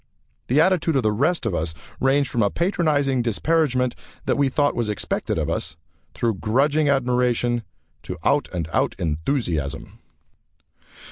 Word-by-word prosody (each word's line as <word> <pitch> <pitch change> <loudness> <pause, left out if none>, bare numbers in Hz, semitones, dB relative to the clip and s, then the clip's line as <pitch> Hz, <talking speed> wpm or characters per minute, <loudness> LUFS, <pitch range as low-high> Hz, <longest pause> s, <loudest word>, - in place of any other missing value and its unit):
The 135 +5 +3
attitude 170 -2 +3
of 135 - +2
the 110 - +2
rest 140 +7 0
of 110 - 0
us 80 -1 -2 0.2
ranged 135 +1 +2
from 120 - 0
a 100 - +3
patronizing 150 - +1
disparagement 125 +1 +1 0.3
that - - +1
we 140 -1 +2
thought 145 +2 +1
was 115 -3 -1
expected 105 - -1
of - - -1
us, 80 - -3 0.4
through 115 -5 -1
grudging 140 +7 +2
admiration, 125 -3 +1 0.4
to - - -6
out - - +2
and 85 -3 -3
out - - +1
enthusiasm. 80 - -2
125 Hz, 145 wpm, -23 LUFS, 110-145 Hz, 0.4 s, The